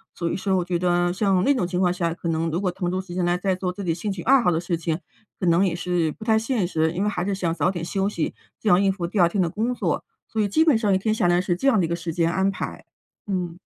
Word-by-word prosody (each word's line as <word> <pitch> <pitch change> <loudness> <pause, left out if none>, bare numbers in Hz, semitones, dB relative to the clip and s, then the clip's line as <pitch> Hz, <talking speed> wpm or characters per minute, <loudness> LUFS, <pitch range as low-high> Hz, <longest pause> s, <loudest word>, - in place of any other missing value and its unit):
所 170 - -2
以 - - -1
说 190 0 0
我 180 - -1
觉 175 -1 -1
得 175 0 +1
像 190 -1 +2
那 285 - +4
种 240 -10 0
情 180 0 -2
况 180 -1 +3
下， 170 -2 -1
可 170 +1 -6
能 165 0 0
如 165 +2 -1
果 185 -2 0
腾 180 -1 -3
出 185 +1 -1
时 185 -2 -7
间 180 0 -1
来 175 0 +2
再 190 +1 0
做 185 0 -2
自 200 +2 -7
己 170 -3 0
兴 200 +5 -3
趣 190 -3 -5
爱 270 +1 +5
好 230 - +2
的 165 -2 +1
事 175 0 -2
情， 165 0 -2 0.4
可 185 - -1
能 170 +2 +4
也 180 -4 +1
是 175 -2 0
不 215 - -10
太 220 -1 +4
现 225 -4 0
实， 160 -2 +1
因 180 +4 -2
为 210 - +1
还 180 -4 -2
是 200 +1 -1
想 175 -3 -1
早 180 - +1
点 175 -3 -4
休 195 +2 0
息， 170 -6 -2 0.3
这 - - -5
样 185 -1 +5
应 195 - +3
付 185 -3 -4
第 195 +4 -2
2 170 -1 +5
天 195 - -2
的 180 - +3
工 225 +8 -1
作。 - - -1 0.2
所 220 - -1
以 205 - +2
基 310 +11 +3
本 310 -5 +5
上 220 -2 +1
一 - - +4
天 215 +3 0
下 215 - +1
来 175 0 +3
是 180 -1 0
这 270 - -1
样 240 -6 +4
的 180 - +2
一 - - -2
个 170 - -1
时 170 -1 -4
间 165 0 +1
安 190 +2 +1
排， 195 - -5 0.4
嗯。 180 -3 -3
180 Hz, 340 characters per minute, -24 LUFS, 175-200 Hz, 0.4 s, 爱